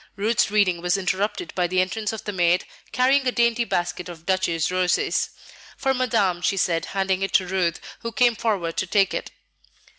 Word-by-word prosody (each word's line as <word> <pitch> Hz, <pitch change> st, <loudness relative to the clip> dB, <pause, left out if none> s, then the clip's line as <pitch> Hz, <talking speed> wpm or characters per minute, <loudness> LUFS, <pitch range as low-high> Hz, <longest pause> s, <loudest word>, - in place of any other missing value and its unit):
Ruth's 215 Hz, +2 st, +1 dB
reading 200 Hz, -5 st, +2 dB
was 180 Hz, +2 st, +1 dB
interrupted 195 Hz, -, -2 dB
by 180 Hz, -1 st, 0 dB
the 185 Hz, +1 st, 0 dB
entrance 195 Hz, +4 st, -1 dB
of 220 Hz, -, -7 dB
the 210 Hz, -, -3 dB
maid, 175 Hz, -2 st, +2 dB, 0.3 s
carrying 265 Hz, +2 st, +3 dB
a -, -, +3 dB
dainty 235 Hz, 0 st, +2 dB
basket 175 Hz, -2 st, -2 dB
of 165 Hz, -2 st, -11 dB
Duchesse 185 Hz, -4 st, 0 dB
roses. 185 Hz, -, +1 dB, 0.5 s
"For 270 Hz, -1 st, +1 dB
Madame," 215 Hz, -9 st, +1 dB
she 195 Hz, -, 0 dB
said, 165 Hz, -3 st, +1 dB
handing 190 Hz, -1 st, +1 dB
it 195 Hz, -1 st, -2 dB
to 185 Hz, -, +4 dB
Ruth, 180 Hz, -2 st, -1 dB, 0.2 s
who 230 Hz, -, -5 dB
came 245 Hz, -2 st, +3 dB
forward 195 Hz, -8 st, -2 dB
to -, -, -1 dB
take 200 Hz, 0 st, +2 dB
it. -, -, -4 dB
195 Hz, 185 wpm, -23 LUFS, 180-225 Hz, 0.5 s, to